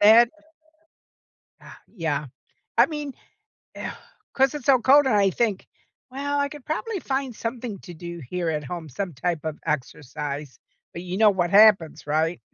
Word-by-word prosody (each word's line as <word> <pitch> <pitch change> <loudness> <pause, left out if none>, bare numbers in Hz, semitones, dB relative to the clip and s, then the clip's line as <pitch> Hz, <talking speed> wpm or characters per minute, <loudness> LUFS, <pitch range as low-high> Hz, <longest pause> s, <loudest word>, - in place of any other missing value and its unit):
that, 225 +3 +7 1.3
ah, - - -13
yeah. 150 -7 -3 0.5
I - - +8
mean, 295 -3 -5 0.6
ugh, - - -5 0.4
'cause 270 +1 +3
it's 290 -5 -6
so 260 -3 +5
cold, 280 +2 +6
and 240 - +3
I 200 -1 +4
think, 215 -2 -1 0.4
"Well, 285 +2 -2
I 285 0 +1
could 295 -3 -11
probably 390 +7 -2
find 265 -4 -2
something 230 -3 -5
to 175 - -10
do 170 +1 -8
here 175 -2 -1
at 150 -1 -2
home, 165 +2 -6
some 180 +4 -4
type 160 +3 -2
of 155 -1 -4
exercise, 145 -1 -4 0.3
but 170 - -7
you 180 +1 -4
know 215 -1 +6
what 175 -3 0
happens, 200 -7 +5
right? 160 +3 0
195 Hz, 165 wpm, -24 LUFS, 160-260 Hz, 1.3 s, I